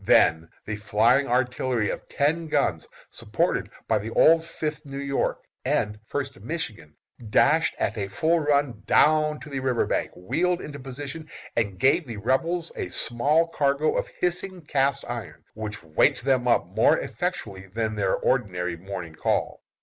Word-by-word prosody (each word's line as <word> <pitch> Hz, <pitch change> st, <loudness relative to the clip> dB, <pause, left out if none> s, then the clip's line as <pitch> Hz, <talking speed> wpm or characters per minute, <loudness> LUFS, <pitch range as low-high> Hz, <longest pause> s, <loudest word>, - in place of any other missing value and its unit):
Then 80 Hz, 0 st, +4 dB, 0.2 s
the 105 Hz, 0 st, -3 dB
flying 110 Hz, +6 st, +3 dB
artillery 125 Hz, -2 st, 0 dB
of -, -, -7 dB
ten 160 Hz, +4 st, 0 dB
guns, -, -, 0 dB, 0.2 s
supported -, -, -1 dB, 0.2 s
by 110 Hz, -2 st, +2 dB
the 105 Hz, +2 st, -5 dB
old 160 Hz, +7 st, +5 dB
Fifth 155 Hz, -2 st, -4 dB
New 140 Hz, -2 st, -8 dB
York 140 Hz, 0 st, -1 dB, 0.2 s
and 105 Hz, 0 st, 0 dB
First 140 Hz, -1 st, -4 dB
Michigan, 110 Hz, -, -5 dB, 0.3 s
dashed 150 Hz, +8 st, +3 dB
at 110 Hz, -1 st, -1 dB
a 100 Hz, -, -2 dB
full 160 Hz, -, +1 dB
run 145 Hz, -7 st, +1 dB
down 150 Hz, -1 st, +4 dB
to 155 Hz, -, -9 dB
the 135 Hz, -, -2 dB
river 130 Hz, -2 st, +1 dB
bank, -, -, -1 dB
wheeled 175 Hz, -, 0 dB
into 145 Hz, -4 st, -7 dB
position, 140 Hz, +4 st, -7 dB, 0.3 s
and 100 Hz, -5 st, 0 dB
gave 140 Hz, -, +3 dB
the 115 Hz, -3 st, -6 dB
Rebels 165 Hz, +10 st, 0 dB
a -, -, -4 dB
small 140 Hz, -, +2 dB
cargo 145 Hz, 0 st, +1 dB
of -, -, 0 dB
hissing 180 Hz, -1 st, -3 dB
cast 140 Hz, -2 st, +1 dB
iron, -, -, -6 dB
which 105 Hz, -2 st, -6 dB
waked 80 Hz, +8 st, +2 dB
them 130 Hz, -2 st, +2 dB
up 120 Hz, -, +3 dB
more -, -, +3 dB
effectually 95 Hz, -1 st, -4 dB
than 110 Hz, +3 st, -2 dB
their 100 Hz, -3 st, +1 dB
ordinary 90 Hz, -9 st, 0 dB
morning 90 Hz, -2 st, -7 dB
call. -, -, -1 dB
130 Hz, 155 wpm, -25 LUFS, 105-150 Hz, 0.3 s, old